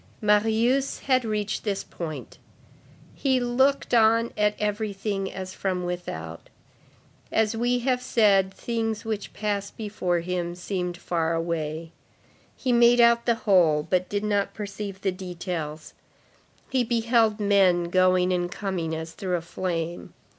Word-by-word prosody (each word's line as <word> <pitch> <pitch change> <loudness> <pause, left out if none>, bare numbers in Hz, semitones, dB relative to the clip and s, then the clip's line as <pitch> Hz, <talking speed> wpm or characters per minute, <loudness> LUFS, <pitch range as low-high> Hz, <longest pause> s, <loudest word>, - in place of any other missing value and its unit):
Marius 225 +6 +2
had 255 -2 +2
reached 210 -2 -2
this 200 -3 -2
point. 160 -3 -7 0.7
He 265 -2 +1
looked 260 +3 +1
on 230 0 +4
at 210 0 +2
everything 205 -2 -2
as 185 -1 -6
from 185 -2 -2
without; 85 - -6 0.8
as 220 0 +1
we 245 +2 +1
have 250 -2 +1
said, 200 -6 +3
things 225 +1 -3
which 215 -2 -3
passed 205 -1 -3
before 195 -5 -1
him 175 0 -3
seemed 180 -1 -3
far 165 -2 -1
away; 165 -1 -3 0.6
he 255 - -1
made 240 0 +6
out 235 0 +5
the 235 - +4
whole, 170 -7 +4
but 185 -1 0
did 205 0 -2
not 205 -1 0
perceive 200 -2 -6
the 195 - +1
details. 175 -4 -6 0.8
He 260 -2 +2
beheld 230 -2 +2
men 195 -4 +4
going 185 0 +3
and 175 0 -1
coming 180 -6 -3
as 160 0 -6
through 180 +2 -2
a - - -5
flame. 170 -1 -4
200 Hz, 135 wpm, -25 LUFS, 175-225 Hz, 0.8 s, made